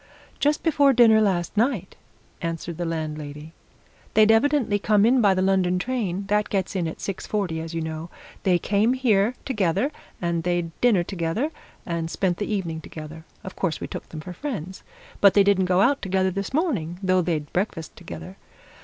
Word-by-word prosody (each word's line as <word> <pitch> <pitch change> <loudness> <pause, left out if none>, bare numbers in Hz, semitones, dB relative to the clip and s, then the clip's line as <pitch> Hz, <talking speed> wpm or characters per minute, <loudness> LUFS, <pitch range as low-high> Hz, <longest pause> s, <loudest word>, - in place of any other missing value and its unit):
"Just 295 +1 +1
before 285 -4 +4
dinner, 225 -3 +6
last 185 -4 0
night," 220 -4 0 0.5
answered 165 -1 -4
the 175 - -2
landlady. 155 -1 -5 0.6
"They'd 215 0 +6
evidently 230 -3 +3
come 210 0 +3
in 250 +2 +4
by 200 -3 +4
the 185 - +1
London 190 -2 +2
train 200 -4 -2
that 210 +1 +1
gets 195 -1 -1
in 175 -3 0
at 160 - -6
six 195 - -5
forty, 190 -6 -1
as 165 0 -6
you 165 - -1
know. 160 +1 -5 0.3
They 180 -2 +3
came 210 +6 +2
here 235 -3 +2
together, 210 - 0 0.3
and 170 -1 -1
they'd 175 -1 -1
dinner 220 -8 +4
together, 185 - -2 0.3
and 170 -2 -2
spent 180 0 0
the 205 - -3
evening 170 -6 -2
together. 160 +1 -9 0.2
Of 190 - -8
course, 170 -5 -1
we - - -4
took - - -7
them 155 - -7
for 180 +3 -8
friends. 190 - -5 0.4
But 200 -1 +6
they 200 - +7
didn't 195 -2 +3
go 180 +1 +3
out 280 +7 +3
together 190 -1 +1
this 195 +1 -4
morning, 245 - -1
though 185 -1 +3
they'd 155 -4 -2
breakfast 175 -4 -2
together. 175 +2 -9
190 Hz, 180 wpm, -24 LUFS, 170-215 Hz, 0.6 s, they